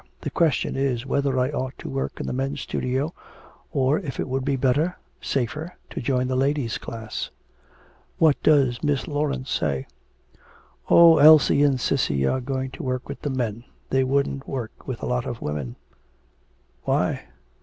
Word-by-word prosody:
The - - -4
question 160 -5 +1
is 135 -3 -1
whether 140 -1 0
I 130 +2 +1
ought 130 -2 -3
to - - -8
work 135 0 -3
in - - -3
the - - -3
men's 135 +2 -2
studio, 135 +6 -2 0.6
or 140 0 +2
if 150 -9 -6
it - - -1
would 130 0 -1
be 140 0 +1
better, 140 +7 +1 0.3
safer, 150 +7 -2 0.2
to - - -4
join 130 0 0
the 130 - -1
ladies' 135 -2 0
class.' 110 -2 -5 0.9
'What 155 -3 +4
does 135 -5 +3
Miss 145 -3 0
Laurence 145 -3 -2
say?' 70 -3 -1 1.0
'Oh, 170 -1 +8
Elsie 155 -1 +7
and 140 -3 +3
Cissy 70 - +1
are 130 - +1
going 130 0 -3
to - - -8
work 130 -1 -2
with - - -7
the 145 - -2
men. 120 -4 -2 0.3
They 130 0 +3
wouldn't 140 +1 0
work 120 -5 -6
with 130 -4 -5
a - - 0
lot 125 -1 -1
of 120 - -4
women.' 70 -5 -4 1.1
'Why?' - - +1
135 Hz, 165 wpm, -24 LUFS, 125-145 Hz, 1.1 s, Oh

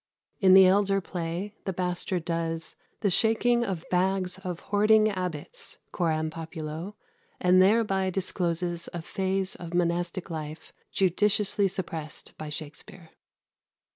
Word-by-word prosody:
In 190 -2 +7
the 190 0 +9
elder 195 +1 +4
play, 175 +2 -4
the 190 - -1
Bastard 180 -1 -1
does 165 -1 -2 0.3
"the 200 - +2
shaking 235 +4 +3
of 185 -6 -3
bags 185 0 +1
of 180 -3 -5
hoarding 215 +1 +4
abbots," 185 - -5
coram 160 -3 0
populo, 165 +3 -6 0.4
and 180 +1 +5
thereby 195 -2 +3
discloses 175 -2 -2
a 170 -2 -5
phase 190 +1 -1
of 175 -1 -7
monastic 175 +1 -1
life 155 -1 -7 0.2
judiciously 200 +2 +2
suppressed 165 -5 -5
by 155 - -5
Shakspere. 155 +3 -8
180 Hz, 120 wpm, -27 LUFS, 165-195 Hz, 0.4 s, the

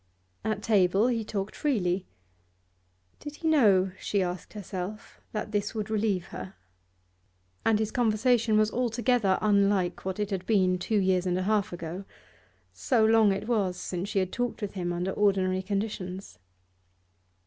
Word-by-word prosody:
At 215 -1 -2
table 200 +1 +3
he 230 -2 0
talked 200 -1 -4
freely; 190 -10 0 1.1
did 295 0 -8
he 325 - -4
know 200 -12 +4
she 200 -2 0
asked 180 0 -5
herself 200 0 -7
that 215 0 -4
this 205 +1 -1
would 215 -1 -3
relieve 205 -4 0
her? 190 - -8 1.1
And 225 -1 +3
his 220 0 -1
conversation 230 -2 +2
was 215 0 +3
altogether 240 -4 +1
unlike 200 -3 +2
what 190 +1 -4
it 205 0 -2
had 185 -2 -3
been 185 -4 +3
two 215 +4 0
years 185 -2 +2
and 180 0 +1
a 185 - -1
half 210 0 +1
ago 175 +2 -6 0.7
so 235 -5 +2
long 220 -2 +5
it 195 +2 -3
was 200 -7 0
since 180 +2 -4
she 205 - -3
had 185 -1 +1
talked 245 0 -2
with 200 - -3
him 175 -3 -3
under 175 +2 -2
ordinary 190 -2 +1
conditions. 190 - -4
205 Hz, 155 wpm, -28 LUFS, 185-220 Hz, 1.1 s, long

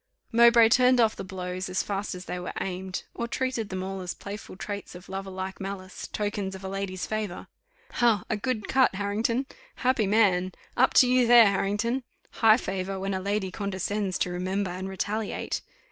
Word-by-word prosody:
Mowbray 235 -1 +7
turned 250 +1 +5
off 225 -2 +4
the - - -6
blows 185 -1 -5
as 185 - 0
fast 200 -1 -3
as 180 +1 -8
they 180 - -4
were 180 - -5
aimed, 185 0 -4
or 235 - -3
treated 250 -4 -2
them 185 0 -3
all 190 0 -4
as 180 -1 -4
playful 200 -1 -8
traits 200 -1 -6
of 180 +1 -11
lover 195 0 -5
like 190 +1 -5
malice, 190 -1 -6
tokens 205 -2 -3
of 190 - -10
a - - -4
lady's 190 -1 -3
favour. 215 -4 -3 0.5
"Ha! 230 -5 +3
a - - 0
good 215 0 -2
cut, 260 -6 +3
Harrington! 220 +6 0 0.3
Happy 255 -5 +1
man! 190 -4 +3 0.2
Up 260 +2 +3
to 255 - +7
you 250 -1 +4
there, 240 -1 +9
Harrington! 210 +6 0 0.3
High 220 -1 +5
favour, 190 -3 -3
when 195 +1 -2
a 190 - -1
lady 200 -1 -1
condescends 200 0 -2
to 180 - -1
remember 185 +2 -2
and 185 +2 -5
retaliate. 205 +3 -2
200 Hz, 185 wpm, -27 LUFS, 190-225 Hz, 0.5 s, there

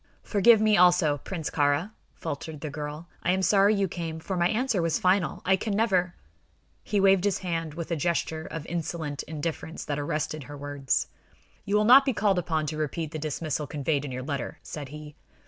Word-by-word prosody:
"Forgive 220 +2 +5
me, 215 -1 +4
also, 175 -5 +4
Prince 165 +1 -5
Kāra," 145 +6 +1 0.2
faltered 145 +1 -6
the 155 - -4
girl. 150 +2 -6
"I 180 - +2
am 190 0 0
sorry 200 +2 +4
you 200 -1 +1
came, 165 -2 -5
for 190 +4 -4
my 175 0 +2
answer 225 -3 +1
was 165 -2 +1
final. 185 -2 +1
I 190 - +5
can 200 +1 -2
never 185 -5 +1 0.3
" - - -39 0.3
He 205 - 0
waved 195 -1 +5
his 205 -2 +1
hand 165 -3 -2
with 170 0 -5
a - - +2
gesture 160 0 -1
of 160 -2 -6
insolent 160 -3 -3
indifference 160 +1 -5
that 145 -1 -2
arrested 150 0 -3
her 145 +1 -9
words. 145 -1 -1 0.6
"You 200 - 0
will 210 0 +3
not 260 +5 +9
be 270 -2 0
called 205 -4 +2
upon 160 -3 -1
to 155 +1 -4
repeat 155 +1 -3
the 155 - -5
dismissal 150 0 -3
conveyed 145 -1 -1
in 140 - -5
your 130 0 -4
letter," 140 -2 -4
said 145 -3 -7
he. 150 0 -9
165 Hz, 200 wpm, -27 LUFS, 150-190 Hz, 0.6 s, not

